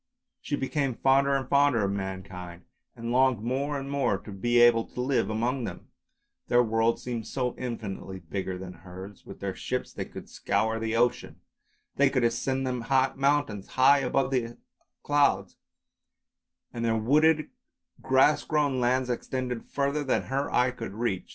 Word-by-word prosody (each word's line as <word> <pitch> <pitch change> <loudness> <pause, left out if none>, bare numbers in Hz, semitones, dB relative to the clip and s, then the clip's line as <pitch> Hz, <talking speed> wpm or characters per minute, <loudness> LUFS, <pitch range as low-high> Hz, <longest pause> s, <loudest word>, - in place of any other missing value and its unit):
She 145 - -2
became 135 -2 -1
fonder 135 +2 +3
and 135 -2 -2
fonder 140 -6 +3
of 100 - 0
mankind, 95 -3 -6 0.3
and 115 +1 -5
longed 130 -3 +3
more 140 +4 -1
and 135 0 -5
more 140 -8 0
to 105 - -11
be 120 +5 0
able 120 -1 +6
to - - -11
live 130 -1 +1
among 120 +3 -1
them; - - -8 0.6
their 120 0 +4
world 115 +1 +1
seemed 120 -2 -5
so 125 -2 -2
infinitely 105 -6 -5
bigger 95 +2 -4
than 90 0 -8
hers; 95 +2 -11
with - - -11
their - - -2
ships - - -4
they - - -4
could - - -10
scour 110 +1 -1
the 115 0 -2
ocean, 120 +1 +1 0.6
they 140 0 +5
could 130 -3 0
ascend 130 +3 0
the 130 +1 +1
mountains 135 -7 0
high 140 +2 +5
above 135 0 0
the 120 -3 -1 0.5
clouds, 140 -10 +2 1.2
and 115 - -4
their 115 -1 +1
wooded, 155 +6 +3 0.5
grass 130 +3 +4
grown 145 -4 +1
lands 125 +1 +1
extended 125 -1 -3
further 140 +1 0
than 135 - 0
her 135 +2 -2
eye 125 +1 +3
could 115 -5 -7
reach. 110 -5 -2
125 Hz, 160 wpm, -27 LUFS, 110-135 Hz, 1.2 s, able